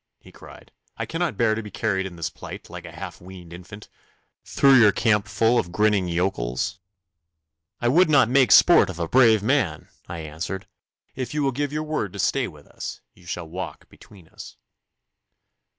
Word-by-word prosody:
he - - -17
cried. - - -15 0.3
'I - - -3
cannot 165 - -3
bear 115 -2 +2
to 110 - -3
be 105 - -9
carried 95 0 -2
in 90 - -11
this 85 -1 -4
plight, - - -10
like - - -9
a 85 - -9
half 85 +1 -9
weaned 90 -2 -12
infant, 100 +4 -11 0.6
through 135 -1 +3
your 105 -3 +6
campful 110 +2 +1
of 85 - -4
grinning 105 -1 +1
yokels.' 85 0 -2 1.0
'I 120 - +2
would 170 +6 +4
not 135 -6 +5
make 130 +1 +3
sport 175 - +6
of 90 - -7
a 85 -1 -2
brave 115 -2 +4
man,' 115 - 0 0.2
I 85 -1 -6
answered. 80 +5 -6 0.5
'If 130 +2 -5
you 150 - 0
will 135 - +1
give 145 +2 -3
your 150 +1 -3
word 155 - -3
to - - -8
stay 125 +6 0
with 75 -4 -14
us, - - -8
you 90 -1 -20
shall 85 -1 -5
walk 90 +3 -8
between 95 -6 -18
us. - - -12
100 Hz, 185 wpm, -23 LUFS, 90-125 Hz, 1.0 s, your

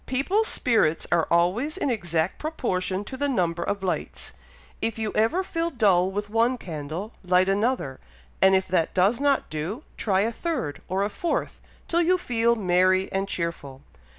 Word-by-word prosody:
People's 370 - +1
spirits 220 - +1
are 170 -2 +3
always 190 - +1
in 285 -8 0
exact 170 -6 -1
proportion 195 - -2
to 235 - -8
the 285 +2 -1
number 175 -8 0
of 200 +2 -2
lights. 185 - -3 0.5
If 225 0 -1
you 220 -1 -2
ever 230 - +2
feel 335 -2 -2
dull 195 - +3
with 205 +2 -3
one 230 +4 +2
candle, 165 +3 -6
light 180 +1 +3
another; 200 - 0 0.4
and 190 0 +6
if 190 0 +1
that 175 -3 +1
does 195 +6 +3
not 280 - +1
do, 170 - -4
try 195 -3 +1
a 225 +3 +1
third, 235 - -3
or 190 +2 0
a 205 - 0
fourth, 340 - -2 0.3
till 340 +1 +2
you 360 +2 +3
feel 235 -7 +1
merry 185 -1 +2
and 195 +1 -1
cheerful. 145 -7 -4
200 Hz, 170 wpm, -25 LUFS, 180-250 Hz, 0.5 s, and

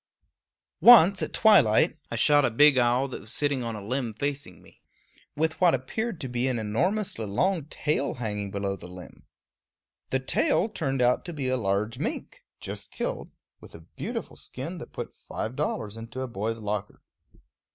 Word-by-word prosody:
Once, 200 -5 +8
at - - -2
twilight, 170 - +5
I - - -4
shot 145 +5 +4
a 125 - +3
big 145 +3 +5
owl 125 +2 +2
that - - -7
was 110 - -10
sitting 145 -3 0
on 115 -2 -4
a 105 -2 -8
limb 125 0 -2
facing 140 +3 -4
me, - - -21 0.5
with 160 +3 -1
what 175 -5 +5
appeared 215 - -4
to 135 - -3
be 125 +1 -1
an 130 -2 0
enormously 115 - -1
long 165 - 0
tail 150 -1 -2
hanging 105 -4 -3
below 100 0 -2
the 90 - -11
limb. 90 0 -13 0.8
The 130 - +1
tail 230 - +1
turned 135 -9 -1
out 125 +1 +2
to 175 - -6
be 135 -4 -2
a 130 - +2
large 105 -1 -1
mink, - - -5 0.2
just - - -6
killed, - - -4 0.3
with - - -14
a 80 - -11
beautiful 80 - -6
skin - - -7
that - - -10
put - - -7
five 110 +4 -6
dollars 105 -4 -2
into 115 +3 -7
a 130 - -3
boy's 115 0 -3
locker. 105 -2 -5
125 Hz, 175 wpm, -27 LUFS, 110-150 Hz, 0.8 s, Once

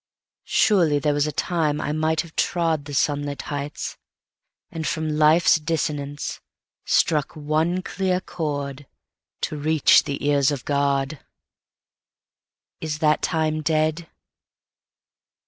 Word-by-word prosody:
Surely 170 -8 +3
there 145 +1 +1
was 145 +1 +1
a - - -2
time 155 -1 0
I 150 - -2
might 155 +1 +1
have 165 -1 -13
trodThe 160 -4 0
sunlit 145 0 -1
heights, 145 +1 -5 0.7
and 160 -1 -4
from 160 -1 -2
life's 155 +2 +5
dissonanceStruck 150 0 -2
one 160 +4 0
clear 185 -2 -1
chord 145 -5 -4 0.5
to 155 - -2
reach 155 0 +4
the 140 0 -4
ears 140 -2 +3
of 140 -4 -4
God:Is 140 0 0 1.8
that 155 -1 +2
tine 155 -2 0
dead? 155 +1 0
155 Hz, 105 wpm, -23 LUFS, 145-160 Hz, 1.8 s, life's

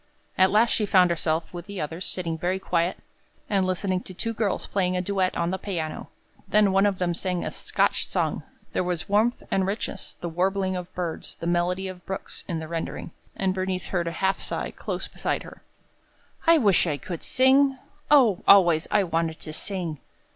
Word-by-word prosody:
At 185 0 +5
last 220 +4 +4
she 210 - +1
found 180 -3 +5
herself, 160 0 -1
with 175 +1 -7
the 200 -2 -6
others, 165 +4 -4
sitting 170 -3 -2
very 175 +3 -1
quiet 175 -2 0 0.5
and 195 -3 +1
listening 185 0 0
to 185 - -10
two 230 +5 -2
girls 210 -3 -1
playing 185 -2 0
a - - +1
duet 190 0 0
on 170 0 0
the 190 - -2
piano. 170 -6 -4 0.4
Then 205 0 +4
one 195 +2 +4
of 200 -2 0
them 180 -1 0
sang 180 0 -2
a - - -3
Scotch - - 0
song. - - -1 0.3
There - - +1
was 175 -3 -2
warmth 215 +4 +2
and 190 -1 +2
richness, 200 -1 -3
the 175 - -6
warbling 190 +3 0
of 180 0 -5
birds, 175 -3 -4
the - - -7
melody 175 +2 0
of 180 -1 -8
brooks, 190 0 -6
in 170 - -2
the 160 0 -5
rendering, 165 0 -4 0.2
and 190 -1 0
Bernice 185 -1 -2
heard 175 -3 -1
a - - -1
half 190 0 +2
sigh - - -3
close - - -4
beside - - -2
her. - - -12 0.9
"I 335 0 +8
wish 200 - +4
I 150 -3 0
could 170 +2 -6
sing! 265 +1 +4 0.3
O, 250 -11 +5
always 175 -5 +6
I 205 - +3
wanted 165 -2 -1
to 155 - -6
sing!" 170 -4 -3
185 Hz, 195 wpm, -25 LUFS, 170-195 Hz, 0.9 s, I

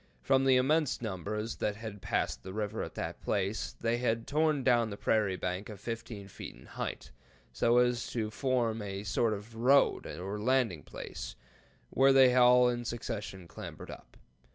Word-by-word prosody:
From 135 - +3
the 135 -1 +5
immense 145 +2 +2
numbers 105 +1 -4
that 105 - -1
had 105 -2 -8
passed - - -1
the 95 - -8
river 105 +1 -3
at - - -6
that - - -5
place, 100 +1 -1
they 115 +1 +1
had 115 -2 0
torn 150 -2 +1
down 120 -3 +3
the 100 - -6
prairie 105 -4 +1
bank 90 +3 -3
of 105 -3 -8
15 115 -2 -6
feet 95 - -9
in - - -16
height, - - -6 0.4
so 115 - +3
as 125 -1 +2
to 110 -3 -3
form 120 -3 0
a 100 -1 -5
sort 110 +4 +1
of 105 +3 -10
road 130 +5 +3
or 100 +4 -5
landing 115 - +1
place, - - -8 0.6
where 135 +1 +5
they 130 -2 +7
all 125 0 +6
in 120 0 -1
succession 105 -6 -5
clambered - - -9
up. - - -13
115 Hz, 175 wpm, -31 LUFS, 105-125 Hz, 0.6 s, they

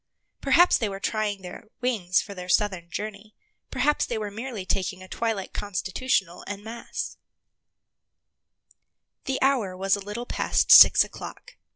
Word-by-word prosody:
Perhaps 350 +1 +4
they 220 - -1
were 195 0 -6
trying 205 -2 -2
their 180 +3 -9
wings 210 -8 0
for 200 - -9
their 180 -1 -9
southern 185 -3 0
journey; 210 +2 -7 0.3
perhaps 280 +3 +1
they 235 - -3
were 210 -1 -4
merely 225 -2 -6
taking 185 -1 -2
a - - -12
twilight 220 -2 -3
constitutional 195 -1 -2
en 205 0 -6
masse. 230 +2 -6 2.1
The 265 -1 -2
hour 235 -9 +1
was 195 +1 +2
a - - -6
little 210 +5 -6
past - - 0
six - - +10
o'clock. - - -10
205 Hz, 145 wpm, -25 LUFS, 190-230 Hz, 2.1 s, six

